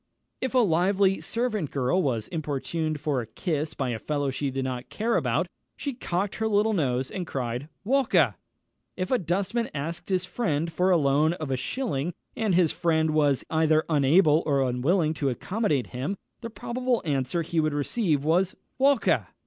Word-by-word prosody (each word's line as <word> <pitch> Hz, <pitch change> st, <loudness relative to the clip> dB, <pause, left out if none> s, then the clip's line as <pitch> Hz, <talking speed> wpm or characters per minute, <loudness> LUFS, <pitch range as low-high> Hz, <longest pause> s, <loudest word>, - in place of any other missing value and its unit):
If 260 Hz, 0 st, -2 dB
a 245 Hz, -3 st, +5 dB
lively 190 Hz, +3 st, +2 dB
servant 225 Hz, -, -1 dB
girl 140 Hz, +7 st, +1 dB
was 120 Hz, -, -1 dB
importuned 155 Hz, 0 st, -2 dB
for 145 Hz, -3 st, 0 dB
a 115 Hz, -, -8 dB
kiss 155 Hz, -, -3 dB
by 135 Hz, -3 st, -1 dB
a 115 Hz, -2 st, -2 dB
fellow 145 Hz, 0 st, -1 dB
she 140 Hz, +1 st, -2 dB
did 135 Hz, 0 st, -2 dB
not 125 Hz, -1 st, -4 dB
care 230 Hz, +2 st, 0 dB
about, -, -, +1 dB, 0.3 s
she 280 Hz, -, -3 dB
cocked 195 Hz, -4 st, -2 dB
her 220 Hz, -, 0 dB
little 215 Hz, +1 st, +2 dB
nose, 130 Hz, -7 st, 0 dB
and 180 Hz, -3 st, -4 dB
cried 125 Hz, +2 st, -3 dB
"Walker!" 265 Hz, +3 st, +3 dB, 0.6 s
If 185 Hz, 0 st, -3 dB
a 255 Hz, -, +3 dB
dustman 195 Hz, +7 st, -1 dB
asked 165 Hz, +6 st, -4 dB
his 185 Hz, -1 st, +1 dB
friend 165 Hz, -6 st, -1 dB
for 180 Hz, +3 st, +2 dB
the 180 Hz, -, +5 dB
loan 150 Hz, +2 st, +3 dB
of 155 Hz, -5 st, -5 dB
a -, -, +2 dB
shilling, 165 Hz, -, -2 dB, 0.2 s
and 215 Hz, -5 st, +1 dB
his 175 Hz, -3 st, +4 dB
friend 160 Hz, -3 st, +1 dB
was 145 Hz, -3 st, +2 dB
either 160 Hz, -1 st, +3 dB
unable 150 Hz, +2 st, +4 dB
or 140 Hz, -2 st, +3 dB
unwilling 155 Hz, +7 st, +1 dB
to 140 Hz, -, +2 dB
accommodate 155 Hz, -, -1 dB
him, 140 Hz, +11 st, -3 dB, 0.2 s
the 230 Hz, -, -6 dB
probable 245 Hz, +1 st, -2 dB
answer 140 Hz, +3 st, 0 dB
he 170 Hz, 0 st, -1 dB
would 155 Hz, -1 st, +1 dB
receive 150 Hz, -, 0 dB
was, 175 Hz, +4 st, +2 dB, 0.2 s
"_Walker! 275 Hz, -2 st, +3 dB
160 Hz, 175 wpm, -26 LUFS, 140-195 Hz, 0.6 s, a